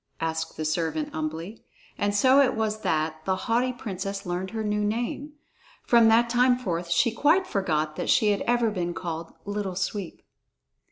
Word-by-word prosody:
asked 160 0 -3
the 155 - -3
servant 155 -1 -1
humbly, 160 +7 -5 0.3
and 205 0 -1
so 260 +6 +5
it 270 - +2
was 215 -1 -1
that 155 0 -1
the 190 - +1
haughty 245 +2 +1
princess 195 -4 -5
learned 180 +1 -3
her 220 +1 -4
new 210 0 0
name. 240 +7 -2 0.5
From 235 -2 +5
that 230 +2 +5
time 245 +1 +3
forth 175 -8 -3
she 170 +8 +3
quite 310 +11 +3
forgot 155 - -1
that - - -3
she 215 - +4
had 200 - -1
ever 240 -2 +2
been 175 -4 -3
called 165 -2 -5
"Little 205 -2 -3
Sweep." 190 0 -4
205 Hz, 170 wpm, -26 LUFS, 165-230 Hz, 0.5 s, so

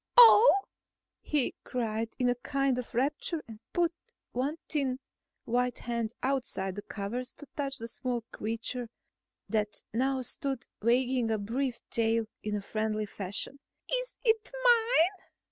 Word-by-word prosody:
"Oh!" 450 -3 +9 0.6
he 295 -4 0
cried 225 -2 -2
in 250 - +2
a 245 - +4
kind 270 +1 0
of 245 - -7
rapture 295 +5 0
and 220 -2 -10
put 345 -1 +2 0.4
one 275 +6 -1
thin 270 -4 0 0.5
white 245 +1 +1
hand 235 -2 -2
outside 255 -8 0
the 205 - -5
covers 225 +6 -4
to 290 - -12
touch 275 -2 -2
the 230 - -6
small 245 -1 -2
creature 230 +2 -3 0.6
that 210 0 -1
now 260 +2 +1
stood 270 0 0 0.2
wagging 245 +1 +2
a 220 - +2
brief 240 +4 -2
tail 230 0 +2 0.2
in 210 -1 -2
friendly 215 +1 -1
fashion. 205 +7 -4 0.3
"Is - - -1
it 445 -2 +2
mine?" 450 -6 +4
250 Hz, 135 wpm, -30 LUFS, 225-280 Hz, 0.6 s, Oh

